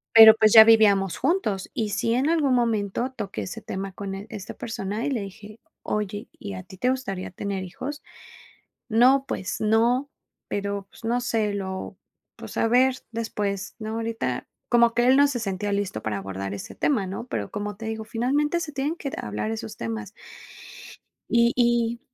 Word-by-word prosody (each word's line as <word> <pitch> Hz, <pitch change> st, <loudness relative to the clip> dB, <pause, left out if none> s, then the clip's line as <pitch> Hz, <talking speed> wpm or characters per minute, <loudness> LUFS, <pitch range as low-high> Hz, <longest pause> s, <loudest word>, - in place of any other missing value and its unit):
pero 220 Hz, -1 st, +11 dB
pues 215 Hz, -1 st, +4 dB
ya 220 Hz, -, +12 dB
vivíamos 205 Hz, -4 st, +4 dB
juntos. 215 Hz, -, 0 dB
Y 215 Hz, -2 st, -1 dB
sí, 205 Hz, +3 st, 0 dB
en 260 Hz, +5 st, +2 dB
algún 300 Hz, -6 st, +2 dB
momento 230 Hz, 0 st, 0 dB
toqué 205 Hz, -4 st, -4 dB
ese 220 Hz, +5 st, -7 dB
tema 195 Hz, -1 st, -5 dB
con 195 Hz, 0 st, -5 dB
él 200 Hz, +2 st, -8 dB
esta 200 Hz, -1 st, -7 dB
persona 220 Hz, -1 st, -4 dB
y -, -, 0 dB
le 235 Hz, -6 st, -1 dB
dije: 210 Hz, +2 st, -10 dB, 0.2 s
“Oye, 210 Hz, -1 st, -3 dB
¿y 100 Hz, -, -7 dB
a 95 Hz, -, -7 dB
ti 190 Hz, -, -13 dB
te 250 Hz, +7 st, +1 dB
gustaría 250 Hz, -8 st, -3 dB
tener 195 Hz, +1 st, -4 dB
hijos?”, 260 Hz, +11 st, -6 dB, 0.9 s
“No, 255 Hz, +4 st, +5 dB
pues 185 Hz, -, -4 dB
no, 235 Hz, +5 st, +2 dB, 0.4 s
pero, 200 Hz, -1 st, -3 dB
pues -, -, -18 dB
no 240 Hz, +2 st, 0 dB
sé, 220 Hz, -4 st, 0 dB
lo 190 Hz, -1 st, -5 dB, 0.4 s
pues -, -, -9 dB
a 225 Hz, -, +3 dB
ver 255 Hz, +2 st, +4 dB, 0.2 s
después. 205 Hz, -4 st, -3 dB
No, 220 Hz, 0 st, -4 dB
ahorita". 225 Hz, -, -3 dB, 0.2 s
Como 235 Hz, -1 st, +5 dB
que 240 Hz, +1 st, +2 dB
él 260 Hz, -, +6 dB
no 285 Hz, +1 st, +6 dB
se 265 Hz, -3 st, -2 dB
sentía 205 Hz, -1 st, -2 dB
listo 200 Hz, -, -2 dB
para 105 Hz, -2 st, -2 dB
abordar 95 Hz, 0 st, -5 dB
ese 100 Hz, -, -8 dB
tema, 220 Hz, -10 st, +1 dB
¿no? 195 Hz, +5 st, -5 dB
Pero 105 Hz, -, -4 dB
como 205 Hz, -1 st, -4 dB
te 225 Hz, -, -7 dB
digo, 220 Hz, 0 st, -4 dB
finalmente 275 Hz, +9 st, 0 dB
se 315 Hz, -3 st, -5 dB
tienen 285 Hz, +4 st, -1 dB
que, 280 Hz, -, -5 dB
eh, -, -, -13 dB
hablar 105 Hz, +1 st, -3 dB
esos 110 Hz, 0 st, -6 dB
temas. 110 Hz, -2 st, -5 dB, 1.2 s
Y 235 Hz, +1 st, +4 dB
y 235 Hz, -1 st, +2 dB
220 Hz, 185 wpm, -25 LUFS, 195-240 Hz, 1.2 s, ya